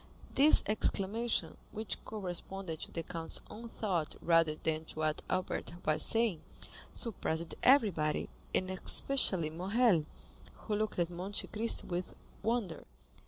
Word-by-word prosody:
This 290 +3 +7
exclamation, 215 +2 0
which 220 +1 -5
corresponded 190 -4 -4
to - - -7
the 165 - -4
count's 165 -1 -3
own 230 +2 -8
thought 180 -9 -2
rather 165 -2 +3
than 155 0 -2
to - - -10
what 155 0 0
Albert 185 -2 -2
was 155 0 +2
saying, 225 -8 +3 0.5
surprised 170 -8 -2
everybody, 200 - +3 0.3
and 185 0 0
especially 185 - +2
Morrel, 190 0 +2 0.5
who 215 - -5
looked 215 0 -2
at 175 -1 0
Monte 185 +4 -3
Cristo 225 +2 +2
with 175 0 -4 0.3
wonder. 225 -7 -1
185 Hz, 125 wpm, -33 LUFS, 165-220 Hz, 0.5 s, This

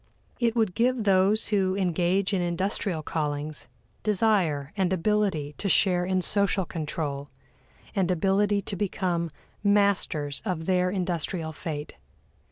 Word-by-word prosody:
It 235 -2 +1
would 220 -6 +2
give 245 +1 +1
those 195 +2 +3
who 190 -3 +2
engage 185 +1 +1
in 190 - +1
industrial 175 -1 -1
callings 150 -1 -3 0.3
desire 185 -9 +1
and 190 -3 +1
ability 190 -5 0
to 200 - -1
share 180 -2 +3
in 185 0 0
social 200 -1 +1
control, 150 -4 -4 0.7
and 190 -3 +1
ability 195 +3 +2
to 200 - -3
become 180 -3 -1 0.3
masters 200 -8 +1
of 180 -6 -3
their 180 0 +2
industrial 175 -3 -2
fate. 155 -1 -5
185 Hz, 125 wpm, -27 LUFS, 165-200 Hz, 0.7 s, those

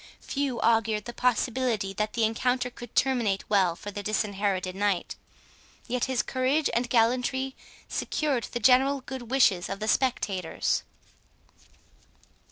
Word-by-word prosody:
Few 275 -4 -2
augured 225 -2 +2
the 240 - -6
possibility 245 -4 0
that 210 +2 -2
the 230 - 0
encounter 250 +3 0
could 240 -1 -11
terminate 235 -7 +1
well 190 -5 +3
for 205 - -8
the 205 - -5
Disinherited 200 -3 -1
Knight, 200 -2 -1 0.7
yet 250 0 0
his 260 -2 0
courage 265 +4 +1
and 240 +1 0
gallantry 250 +3 +1 0.3
secured 275 -7 -1
the 240 - -5
general 265 +3 +4
good 255 -2 -8
wishes 230 -9 +3
of 195 - -4
the 215 - -3
spectators. 200 -8 0
235 Hz, 130 wpm, -27 LUFS, 205-255 Hz, 0.7 s, general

